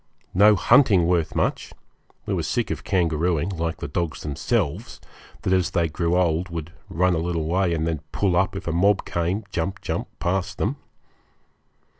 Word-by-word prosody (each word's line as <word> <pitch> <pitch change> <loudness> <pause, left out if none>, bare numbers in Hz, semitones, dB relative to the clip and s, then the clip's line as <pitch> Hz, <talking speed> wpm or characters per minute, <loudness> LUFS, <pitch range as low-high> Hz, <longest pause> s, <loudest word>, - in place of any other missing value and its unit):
No 105 +3 +6
hunting 105 - +5
worth 85 -2 +1
much - - -1 0.5
we - - -2
were - - 0
sick - - -1
of - - -4
kangarooing, 85 -2 +1
like 85 -1 -2
the - - -5
dogs 85 +2 -3
themselves, 75 - -2 0.4
that 95 - +1
as 95 -2 +2
they 85 -3 0
grew 85 +2 0
old 90 0 +1
would 85 0 -6 0.2
run 90 +2 +2
a 80 - 0
little 85 -1 -2
way 90 +2 +1
and 80 -1 0
then 80 -2 -1
pull 95 -4 +1
up 95 +2 +1
if 95 - -6
a - - +1
mob 95 +4 +2
came, 85 +5 -1
jump, 95 +3 -2
jump, 95 - -3
past 95 +1 -2
them. 125 +8 -1
90 Hz, 175 wpm, -23 LUFS, 80-95 Hz, 0.5 s, No